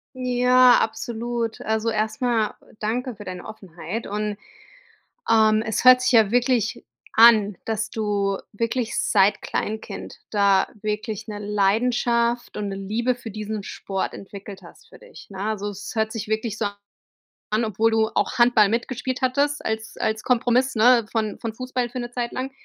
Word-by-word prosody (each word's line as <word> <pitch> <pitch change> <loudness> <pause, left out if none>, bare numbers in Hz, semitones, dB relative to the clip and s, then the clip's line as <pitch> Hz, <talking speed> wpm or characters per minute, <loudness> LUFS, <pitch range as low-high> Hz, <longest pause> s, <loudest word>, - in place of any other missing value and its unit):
Ja, 250 0 +5
absolut. 230 0 -3
Also 220 +1 -1
erst 215 +1 -2
mal 235 -4 +1 0.3
danke 240 +3 -2
für 205 0 -11
deine 185 -1 -7
Offenheit 190 0 -7
und, 210 0 -3 0.9
ähm, 220 -1 +4
es 220 - -1
hört 255 0 +8
sich 255 0 +1
ja 220 -3 +5
wirklich 245 -1 +1 0.3
an, 215 -4 +6
dass 220 -1 -2
du 200 -3 -1
wirklich 230 +2 -2
seit 200 -1 +3
Kleinkind 220 +1 -5
da 200 -2 +3
wirklich 210 0 -3
'ne 205 -1 -5
Leidenschaft 235 +4 +1
und 205 -1 -3
'ne 195 - -4
Liebe 225 +6 -1
für 240 -2 -9
diesen 215 0 -5
Sport 195 0 -4
entwickelt 195 0 -10
hast 170 - -16
für - - -16
dich, - - -14
ne? 190 -1 -8
Also, 205 -1 -2
es 200 +4 -8
hört 220 -1 0
sich 215 -2 -5
wirklich 220 0 -2
so 215 - 0 0.8
an, 215 +2 +1
obwohl 220 +1 +1
du 220 0 +2
auch 255 - 0
Handball 240 -4 +5
mitgespielt 250 +3 -2
hattest 285 +3 +1
als 220 0 -3
als 220 0 -1
Kompromiss, 250 +1 +2
ne, 235 0 +5
von 220 -2 -1
von 230 -2 -4
Fußball 250 0 -3
für 250 +1 -6
'ne 240 0 -5
Zeit 240 -1 -3
lang, 260 +1 -4
220 Hz, 160 wpm, -23 LUFS, 210-240 Hz, 0.9 s, hört